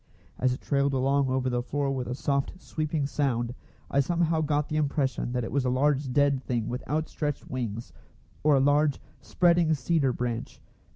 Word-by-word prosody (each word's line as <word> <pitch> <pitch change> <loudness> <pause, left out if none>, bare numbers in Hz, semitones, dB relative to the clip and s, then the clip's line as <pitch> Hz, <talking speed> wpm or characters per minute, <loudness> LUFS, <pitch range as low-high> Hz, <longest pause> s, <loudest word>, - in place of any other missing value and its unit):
As 130 0 +2
it 125 - -4
trailed 140 -1 +1
along 135 +1 +2
over 130 0 0
the 125 -1 0
floor 140 +2 -1
with 130 -2 -3
a 125 - -3
soft, 140 +6 -1
sweeping 155 -4 -2
sound, 125 -4 -1 0.4
I 140 - +2
somehow 165 +2 +1
got 150 -1 0
the 155 - -2
impression 140 -4 0
that 125 -1 -1
it 115 - -5
was 140 -1 +1
a 125 - +1
large 135 +1 +1
dead 140 0 +2
thing 115 -3 -2
with 125 +1 -4
outstretched 150 0 -2
wings, 120 -3 -4 0.5
or 150 -1 +5
a - - +4
large, 145 +1 +3 0.2
spreading 170 -2 +3
cedar 140 +1 +1
branch. 120 -1 -4
140 Hz, 180 wpm, -27 LUFS, 125-150 Hz, 0.5 s, or